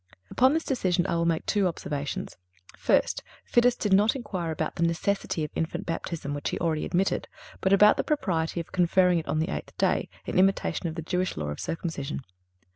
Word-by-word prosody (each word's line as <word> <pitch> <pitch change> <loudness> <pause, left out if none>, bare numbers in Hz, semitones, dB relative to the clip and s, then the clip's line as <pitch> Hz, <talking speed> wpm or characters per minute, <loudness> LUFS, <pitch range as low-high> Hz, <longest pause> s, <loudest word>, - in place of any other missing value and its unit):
Upon 260 +2 +4
this 325 0 0
decision, 185 -9 +1
I - - -1
will 170 0 +1
make 165 -1 0
two 205 -3 +2
observations: 145 -4 -4 0.4
First—Fidus 240 0 +1
did 205 -3 0
not 210 +5 +4
inquire 185 -9 -4
about 160 0 -2
the - - -3
necessity 170 0 0
of 150 - -4
infant 170 +4 -3
baptism, 165 -3 -4
which 145 0 -2
he - - -3
already 160 -3 0
admitted, 190 +2 0 0.3
but 190 - +1
about 210 +2 +6
the - - +1
propriety 175 - -1
of 165 - -6
conferring 180 0 +3
it 160 - -8
on 140 +2 0
the 160 +4 0
eighth - - -6
day, - - +1 0.2
in - - 0
imitation 195 -1 +2
of 160 - -4
the 165 - -4
Jewish 180 +3 -1
law 75 -1 -3
of 75 - -5
circumcision. 160 -4 -4
170 Hz, 195 wpm, -27 LUFS, 160-195 Hz, 0.4 s, about